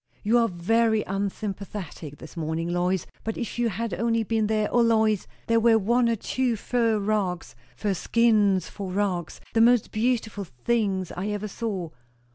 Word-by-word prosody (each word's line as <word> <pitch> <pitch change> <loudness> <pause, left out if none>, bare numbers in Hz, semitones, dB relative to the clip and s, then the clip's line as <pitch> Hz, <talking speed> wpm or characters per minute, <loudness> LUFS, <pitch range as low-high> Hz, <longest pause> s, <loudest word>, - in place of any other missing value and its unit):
You 225 +3 +4
are 230 - +3
very 220 +5 +2
unsympathetic 195 -5 -5
this 160 - -12
morning, 160 0 -2
Lois! 175 +1 0 0.2
But 225 - -3
if 240 0 -4
you 240 -1 +2
had 225 +1 -3
only 230 +4 +1
been 220 0 0
there. 215 -1 +1
O 240 - +4
Lois, 220 -3 +2 0.2
there 230 0 +3
were 225 0 +5
one 235 +3 +2
or 230 - +2
two 245 +2 -1
fur 230 0 +1
rugs 200 -4 -1 0.2
fur 205 -2 -1
skins 205 -3 +3
for 195 -3 -6
rugs, 185 -4 -1
the 225 - +4
most 240 -1 +4
beautiful 220 -2 0
things 190 - -1
I 185 +3 -4
ever 210 0 -3
saw. 195 -6 -4
215 Hz, 165 wpm, -26 LUFS, 190-230 Hz, 0.2 s, were